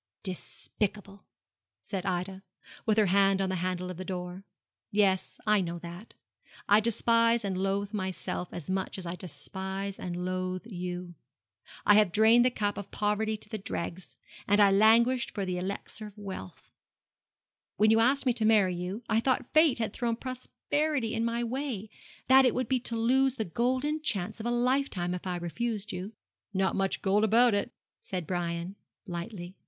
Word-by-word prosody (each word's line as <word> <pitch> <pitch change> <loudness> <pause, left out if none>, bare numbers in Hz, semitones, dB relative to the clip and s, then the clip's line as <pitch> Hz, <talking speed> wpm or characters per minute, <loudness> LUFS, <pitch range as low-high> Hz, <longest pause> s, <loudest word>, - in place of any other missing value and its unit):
'Despicable,' 200 +1 -3 0.6
said 195 -2 -4
Ida, 185 +1 -2 0.5
with 215 -1 +3
her 215 - +5
hand 195 +1 +3
on 190 -1 0
the 185 - -1
handle 180 0 -2
of 180 - -8
the 185 - -5
door. 180 0 -5 0.5
'Yes, 195 -2 +1
I 210 -2 +4
know 170 -1 -3
that. 175 +5 -10 0.5
I 205 +1 +6
despise 230 0 +3
and 195 -2 -1
loathe 195 +2 -1
myself 185 -2 -3
as 175 - -7
much 190 +1 -2
as 185 - -6
I 170 - -3
despise 190 +4 -4
and 180 0 -4
loathe 185 +1 -3
you. 180 -4 -5 0.7
I 210 - +7
have 210 -3 +5
drained 220 +4 +6
the 250 - +4
cup 205 -4 -2
of 200 - -8
poverty 215 +1 0
to - - -14
the 215 - -5
dregs, 180 -1 -5 0.3
and 205 +1 +4
I 200 -1 +6
languished 230 +5 +4
for 200 -2 -1
the 180 -1 -2
elixir 200 +3 -4
of 210 0 -15
wealth. 190 - -8 1.1
When 215 +2 +5
you 225 - +5
asked 270 +5 +3
me 250 - +3
to 230 -2 -1
marry 210 -4 +4
you, 180 +6 -5
I 220 -1 +2
thought 255 0 0
Fate 310 -3 +5
had 225 -2 -2
thrown 235 -1 -1
prosperity 260 +1 -2
in 225 - 0
my 235 +1 0
way 235 -4 -4 0.4
that 265 +1 +7
it 250 - +3
would 255 -2 -1
be 255 +2 +1
to 235 -1 -3
lose 260 +3 +3
the 220 - -2
golden 255 - 0
chance 215 -6 -1
of 225 - -3
a - - +1
lifetime 240 -7 0
if 180 +1 -5
I 180 - -1
refused 210 +4 -3
you.' 185 +4 -6 0.4
'Not 190 0 +1
much 195 -1 -1
gold 205 +2 +3
about 230 +2 +5
it,' 205 - 0 0.3
said 180 -3 -4
Brian, 175 +1 -3 0.3
lightly. 175 0 -6
205 Hz, 175 wpm, -29 LUFS, 185-230 Hz, 1.1 s, I